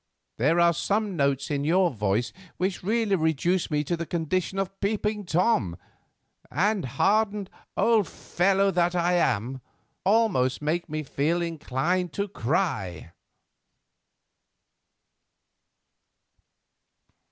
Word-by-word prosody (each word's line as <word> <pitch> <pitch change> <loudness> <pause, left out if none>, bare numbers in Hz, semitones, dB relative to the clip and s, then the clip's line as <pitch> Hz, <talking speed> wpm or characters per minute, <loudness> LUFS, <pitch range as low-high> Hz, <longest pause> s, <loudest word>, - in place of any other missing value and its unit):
There 150 +9 +2
are 170 0 +5
some 205 +3 -1
notes 140 -1 0
in 140 -1 0
your 175 +4 +3
voice 105 0 -1 0.2
which 185 +1 -1
really 215 +1 +1
reduce 160 +2 +1
me 150 -1 0
to 170 +4 -1
the 170 -1 -5
condition 175 +3 -1
of 195 0 -3
peeping 210 0 -1
Thomas, 160 - +1 0.7
and, 195 +4 +1
hardened 205 - +1 0.3
old 225 -5 +3
fellow 195 +2 +1
that 175 0 +1
I 175 0 +2
am, 130 - 0 0.4
almost 190 - +2
make 160 +3 -2
me 155 0 -3
feel 150 +4 0
inclined 165 +2 -1
to 200 0 -2
cry." 125 - -2
175 Hz, 105 wpm, -26 LUFS, 140-195 Hz, 0.7 s, are